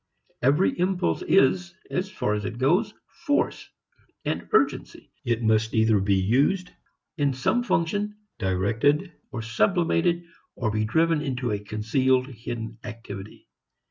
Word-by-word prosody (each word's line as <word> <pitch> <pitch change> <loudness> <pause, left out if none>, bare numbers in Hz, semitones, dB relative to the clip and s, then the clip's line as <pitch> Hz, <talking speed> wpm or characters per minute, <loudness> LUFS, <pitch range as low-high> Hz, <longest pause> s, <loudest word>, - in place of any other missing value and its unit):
Every 145 +8 +3
impulse 180 - 0
is, 175 +6 +2 0.2
as 185 +2 -1
far 105 - -1
as 105 0 -2
it 110 +3 -4
goes, 180 - +2 0.4
force, 290 - 0 0.6
urgency. 435 - 0
It 120 -1 0
must 110 +1 +2
either 110 -1 +4
be 100 0 +2
used 140 - +2 0.5
in 140 -2 +2
some 130 - +1
function, 205 0 0 0.2
direct 95 +4 -1 0.5
or 115 -3 -4
sublimated, 170 - +1 0.3
or 115 -4 -1
be 110 0 0
driven 160 +7 +2
into 130 -4 -2
a 105 - -1
concealed, 125 +5 +1
hidden 115 -2 -6
activity. 110 -4 -9
125 Hz, 125 wpm, -25 LUFS, 110-170 Hz, 0.6 s, either